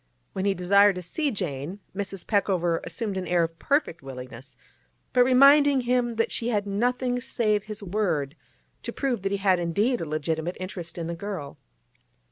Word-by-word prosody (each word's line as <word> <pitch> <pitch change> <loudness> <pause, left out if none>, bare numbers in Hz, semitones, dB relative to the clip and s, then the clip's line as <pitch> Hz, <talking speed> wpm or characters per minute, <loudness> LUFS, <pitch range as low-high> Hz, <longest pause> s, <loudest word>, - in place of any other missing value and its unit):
When 190 - -2
he 200 -1 +2
desired 200 +2 +4
to 180 - -6
see 295 - -1
Jane, 165 - -4 0.2
Mrs. 195 -1 -5
Peckover 180 -5 +1
assumed 210 -5 -3
an 185 - -3
air 175 -1 +3
of 165 0 -4
perfect 285 - 0
willingness, 130 -1 -9 0.6
but 250 - +6
reminded 275 +1 +6
him 240 -1 +1
that 225 - 0
she 235 - -1
had 205 -3 0
nothing 245 +4 0
save 215 -4 0
his 215 -1 -6
word 175 -8 -1 0.5
to - - -4
prove 260 -7 -1
that 195 0 -2
he 200 - +1
had 190 -2 +2
indeed 205 +9 0
a - - -2
legitimate 160 +3 -2
interest 180 -3 -6
in 170 - -3
the 170 - -3
girl. 165 -6 -6
200 Hz, 175 wpm, -26 LUFS, 170-235 Hz, 0.6 s, but